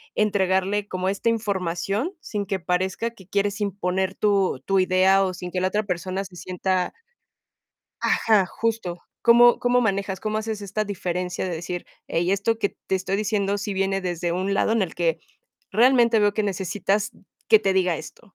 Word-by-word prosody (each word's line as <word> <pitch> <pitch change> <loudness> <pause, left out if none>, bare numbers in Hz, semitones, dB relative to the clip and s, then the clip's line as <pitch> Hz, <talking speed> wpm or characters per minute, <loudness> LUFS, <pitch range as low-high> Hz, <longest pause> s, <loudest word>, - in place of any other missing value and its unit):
entregarle 200 -1 +1
como 185 +1 -2
esta 200 +4 0
información, 200 - -1
sin 205 -2 -4
que 195 0 -1
parezca 190 +6 -1
que 190 -6 -17
quieres 200 +1 -1
imponer 190 -1 -1
tu 195 -9 +1
tu 195 -1 +2
idea, 185 +1 +4
o 185 - -1
sin 180 -1 -7
que 180 - -1
la 185 - +2
otra 210 +2 0
persona 185 0 -3
se 185 -1 -13
sienta? 185 +1 -1 1.1
ajá, 210 -4 +3
justo. 215 -4 -3 0.2
¿Cómo 240 +1 +6
cómo 245 0 +3
manejas, 200 -3 -1
cómo 215 0 -2
haces 220 -1 -3
esta 200 +2 -2
diferencia, 180 -2 -3
de 180 - -3
decir: 175 +2 -5 0.2
"Hey, 175 +3 0
esto 220 +3 0
que 200 - +1 0.2
te 190 - +1
estoy 190 +1 -1
diciendo 205 -1 0
sí 205 0 -3
viene 195 0 0
desde 175 -1 -2
un 190 +3 -1
lado 210 - +2
en 225 -2 +2
el 175 -4 -2
que, 170 -2 0 0.5
realmente 235 +1 +4
veo 205 -1 +3
que 215 - -1
necesitas 200 +1 -1 0.4
que 440 - +8
te 195 - +1
diga 180 -3 +2
esto?" 175 +6 -12
195 Hz, 175 wpm, -24 LUFS, 185-210 Hz, 1.1 s, que